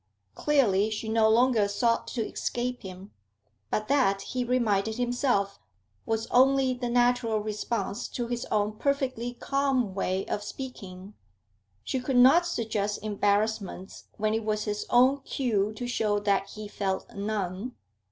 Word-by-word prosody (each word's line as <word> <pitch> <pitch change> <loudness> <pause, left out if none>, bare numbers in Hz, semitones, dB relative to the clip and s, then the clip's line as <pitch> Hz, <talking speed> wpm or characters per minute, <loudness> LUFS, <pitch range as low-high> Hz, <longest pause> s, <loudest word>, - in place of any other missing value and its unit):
Clearly 215 - +2
she 220 +1 -4
no 220 0 +4
longer 230 -2 +4
sought 230 +3 0
to 225 -4 -2
escape 245 +1 -3
him. 190 +1 -10 0.6
But 215 - -1
that, 245 -9 +2
he 250 +3 -2
reminded 220 -4 +1
himself, 245 -5 0 0.5
was 225 0 0
only 265 +1 +4
the 245 -1 -4
natural 245 -2 +2
response 210 -1 -3
to 240 - -4
his 240 0 -3
own 210 0 -1
perfectly 260 -4 -1
calm 270 -6 0
way 190 0 -1
of 205 - -3
speaking; 205 -5 -8 0.7
she 260 - -2
could 255 0 -1
not 275 +8 +6
suggest 215 -9 -1
embarrassments 205 -2 -1
when 215 0 0
it 225 0 -1
was 215 0 -1
his 210 -1 -3
own 255 +3 +5
cue 215 -7 0
to 245 +3 -5
show 215 -4 0
that 200 -1 0
he 215 0 -8
felt 195 -2 -3
none. 200 +2 -3
220 Hz, 140 wpm, -27 LUFS, 205-250 Hz, 0.7 s, not